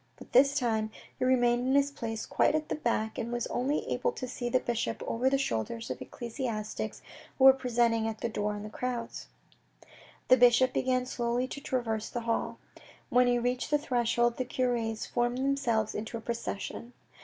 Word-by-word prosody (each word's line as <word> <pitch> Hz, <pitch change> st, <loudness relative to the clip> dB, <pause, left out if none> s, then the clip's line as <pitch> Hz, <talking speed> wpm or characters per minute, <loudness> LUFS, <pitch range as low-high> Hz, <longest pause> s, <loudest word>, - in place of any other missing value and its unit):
But -, -, -14 dB
this 275 Hz, +3 st, +5 dB
time 220 Hz, -4 st, 0 dB, 0.3 s
he -, -, 0 dB
remained 245 Hz, -1 st, +3 dB
in 265 Hz, -, +3 dB
his 280 Hz, 0 st, +3 dB
place 225 Hz, -5 st, -4 dB
quite -, -, +2 dB
at 310 Hz, 0 st, -2 dB
the -, -, 0 dB
back, 225 Hz, -6 st, -1 dB
and 235 Hz, 0 st, -3 dB
was 240 Hz, -1 st, -1 dB
only 270 Hz, +4 st, -1 dB
able 480 Hz, -, 0 dB
to 255 Hz, -, -5 dB
see 245 Hz, -1 st, -4 dB
the 255 Hz, -, +3 dB
bishop 235 Hz, -2 st, -2 dB
over 250 Hz, +3 st, +1 dB
the 275 Hz, -, +2 dB
shoulders 115 Hz, -, -2 dB
of 125 Hz, -, -6 dB
ecclesiastics 230 Hz, -3 st, -5 dB, 0.3 s
who 265 Hz, -, +1 dB
were 265 Hz, 0 st, +10 dB
pressing 235 Hz, -3 st, +1 dB
at 220 Hz, -1 st, -5 dB
the -, -, 0 dB
door 210 Hz, -2 st, -2 dB
in 205 Hz, +1 st, -6 dB
crowds. 240 Hz, -1 st, -4 dB, 1.0 s
The 255 Hz, -, +7 dB
bishop 245 Hz, +1 st, +5 dB
began 255 Hz, -1 st, +1 dB
slowly 240 Hz, 0 st, -1 dB
to 280 Hz, -, -6 dB
traverse 225 Hz, -5 st, -2 dB
the 240 Hz, -, -4 dB
hall. 230 Hz, 0 st, -1 dB, 0.5 s
When 250 Hz, 0 st, +4 dB
he 245 Hz, 0 st, +3 dB
reached 245 Hz, +1 st, -1 dB
the 295 Hz, -, +4 dB
threshold, 240 Hz, -4 st, +1 dB
the 255 Hz, -, 0 dB
cures 240 Hz, -3 st, -1 dB
formed 240 Hz, 0 st, 0 dB
themselves 260 Hz, -5 st, 0 dB
into 220 Hz, +2 st, -4 dB
a -, -, -8 dB
procession. 235 Hz, +1 st, -5 dB
240 Hz, 185 wpm, -30 LUFS, 230-255 Hz, 1.0 s, were